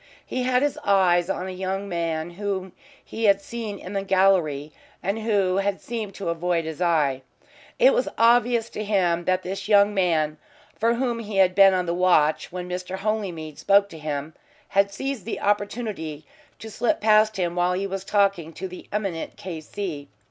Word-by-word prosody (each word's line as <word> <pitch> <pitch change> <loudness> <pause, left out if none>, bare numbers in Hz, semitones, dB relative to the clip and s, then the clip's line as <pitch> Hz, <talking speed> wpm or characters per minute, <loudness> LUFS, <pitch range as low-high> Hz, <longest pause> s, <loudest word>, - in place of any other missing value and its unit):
He 255 - -3
had 250 +1 +2
his 290 - -1
eyes 185 -3 +3
on 185 -1 -2
a - - -4
young 190 +2 -3
man 165 -2 -2
whom 190 0 -4 0.3
he 225 - -3
had 200 -1 +5
seen 215 0 -6
in 185 +1 -9
the 195 - 0
gallery, 185 -7 +2 0.3
and 200 +4 -1
who 200 -4 +1
had 195 0 0
seemed 215 -4 -5
to 195 - -4
avoid 170 0 0
his 160 +1 -6
eye. 150 -6 +2 0.6
It - - +6
was - - +1
obvious 235 0 +3
to 215 - -4
him 180 -5 +1
that 185 0 +1
this 195 +2 -5
young 205 -1 +5
man, 160 -5 +1 0.4
for 230 +2 +1
whom 240 -1 -1
he 215 -3 -5
had 185 -1 +5
been 195 0 +6
on 180 -1 0
the 170 - -1
watch 175 -4 +2
when 180 0 -5
Mr. 180 +1 -4
Holymead 190 -7 -3
spoke 200 0 +4
to 160 - -10
him, 150 0 -4 0.4
had 200 0 +2
seized 270 +2 -4
the 230 - -4
opportunity 205 -7 -2 0.3
to 220 - -9
slip 230 +3 0
past 215 0 +4
him 175 -2 -1
while 180 0 +2
he 190 +2 -1
was 195 -1 -4
talking 195 -5 +1
to 190 - -5
the 180 0 -11
eminent 195 -6 -3
K.C. 165 -3 -6
195 Hz, 185 wpm, -24 LUFS, 175-210 Hz, 0.6 s, It